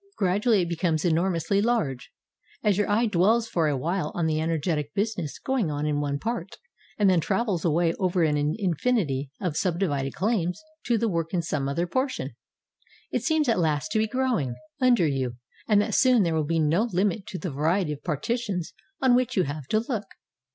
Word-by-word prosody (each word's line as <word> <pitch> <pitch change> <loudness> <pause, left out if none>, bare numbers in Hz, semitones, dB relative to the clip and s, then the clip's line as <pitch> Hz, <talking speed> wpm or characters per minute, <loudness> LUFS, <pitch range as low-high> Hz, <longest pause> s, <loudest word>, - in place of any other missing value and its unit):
Gradually 205 +2 +2
it 170 - -4
becomes 165 -2 0
enor 175 +1 +2
mously 170 +4 0
large, 190 - -1 0.5
as 205 -2 +3
your 205 +2 0
eye 220 +4 +3
dwells 215 +3 +2
for 165 -7 +1
a 145 -2 0
while 165 +3 -1
on 170 - 0
the 155 -1 +1
en 160 +1 -1
ergetic 150 -2 -1
business 200 -7 -2
going 260 -10 -1
on 145 0 -2
in 150 -1 0
one 140 -1 -1
part, 200 +1 -4 0.4
and 205 - +3
then 185 -2 +4
travels 190 0 0
away 165 0 +2
over 185 -2 +1
an 150 -2 +2 0.2
infinity 175 - 0
of 180 -6 -2
subdivided 160 -7 -1
claims 185 -4 0 0.3
to 240 -1 +2
the 230 - +1
work 165 -3 -2
in 170 - 0
some 145 -4 -2
other 170 +5 0
portion. 260 +9 -2 0.8
It - - 0
seems 315 -3 +1
at 230 -5 +2
last 150 -4 0
to 220 - +2
be 220 - +2
growing 235 - 0 0.2
under 245 -8 +4
you 130 -4 -1 0.3
and 210 -2 +4
that 215 0 -3
soon 255 -5 +5
there 170 -2 0
will 155 -1 +1
be 165 +2 0
no 165 +8 +2
Hmit 195 0 0
to 185 - -5
the 180 -3 -4
variety 160 +4 +1
of 145 - -11
partitions 185 - -2 0.3
on 260 -2 +5
which 250 -1 +1
you 185 - +4
have 145 -2 -5
to 215 +6 +2
look. 215 -6 -2
180 Hz, 200 wpm, -26 LUFS, 155-215 Hz, 0.8 s, soon